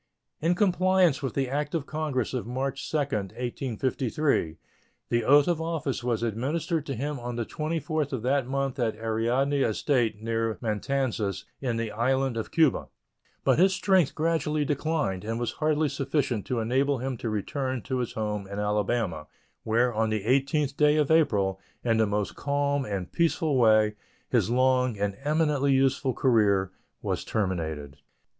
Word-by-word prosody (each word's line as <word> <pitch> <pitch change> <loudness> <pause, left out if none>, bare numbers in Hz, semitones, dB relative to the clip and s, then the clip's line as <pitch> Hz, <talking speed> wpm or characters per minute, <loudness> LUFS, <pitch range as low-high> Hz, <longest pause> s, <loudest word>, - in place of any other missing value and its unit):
In 170 +3 +2
compliance 185 -5 +3
with 135 -4 -3
the 135 -1 0
act 145 +4 -2
of 155 -4 -1
Congress 150 -6 -2
of 125 -3 -3
March 135 +2 -3
2, 155 - 0
1853, 125 - -1 0.5
the 120 0 +1
oath 145 +4 +5
of 170 -2 +1
office 160 -6 -2
was 120 -2 -1
administered 150 - -1
to 135 - -3
him 140 +3 -3
on 120 0 -5
the 120 -1 -2
24th 155 0 -2
of 130 -5 -3
that 135 0 +1
month 135 0 -2
at 115 -3 0
Ariadne 120 +6 0
estate, 115 -2 +1
near 115 0 -1
Matanzas, 110 -4 -1
in 125 -4 -2
the 115 -1 -2
island 130 +3 0
of 115 - -3
Cuba; 160 -5 +2 0.6
but - - +3
his 190 +1 +5
strength 185 -6 +2
gradually 155 -2 0
declined, 145 - -1
and 115 +2 -3
was 120 - -1
hardly 155 0 +1
sufficient 135 -5 -1
to 125 - -1
enable 135 +5 +1
him 130 +1 -3
to 115 - -3
return 130 +4 -2
to 130 -1 -2
his 120 - -3
home 105 -2 -3
in 100 +1 -7
Alabama, 105 -5 -1 0.3
where, 120 +2 +1
on 110 0 +1
the 110 -2 -1
18th 140 +3 +1
day 150 0 +4
of 150 -1 +2
April, 100 -12 +2 0.2
in 115 -2 +2
the 110 -1 +3
most 105 0 -2
calm 140 -1 0
and 100 -4 -4
peaceful 160 -3 +1
way, 110 -3 +4 0.4
his - - +2
long 125 -1 +2
and 100 -1 -1
eminently 150 -2 +2
useful 135 -1 +2
career 100 -7 +3 0.3
was - - -2
terminated. 80 -8 -3
130 Hz, 160 wpm, -27 LUFS, 110-145 Hz, 0.6 s, oath